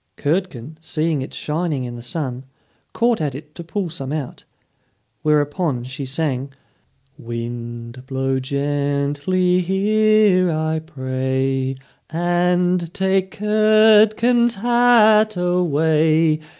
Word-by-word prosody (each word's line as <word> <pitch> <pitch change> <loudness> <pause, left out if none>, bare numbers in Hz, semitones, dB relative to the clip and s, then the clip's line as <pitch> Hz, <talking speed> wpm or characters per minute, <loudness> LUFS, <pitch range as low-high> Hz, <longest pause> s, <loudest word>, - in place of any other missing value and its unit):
Curdken, 155 -3 -3
seeing 160 -2 -1
it 130 - -7
shining 155 -3 -3
in 120 -1 -6
the 120 - -8
sun, 130 -1 -4 0.5
caught 235 -4 +1
at 145 -4 -2
it 150 +2 -11
to 170 - -9
pull 185 +3 -3
some 135 -4 -6
out. 150 -4 -5 0.8
Whereupon 150 -2 0
she 135 +3 -6
sang: 135 -1 -2 0.7
"Wind, 120 +1 -7
blow 135 0 -1
gently 145 +6 0
here, 200 0 +3
I 160 0 -1
pray, 130 -3 -2 0.3
And 175 +1 0
take 190 0 +1
Curdken's 215 +3 +4
hat 220 -2 +4
away. 160 -2 +2
160 Hz, 100 wpm, -20 LUFS, 135-185 Hz, 0.8 s, Curdken's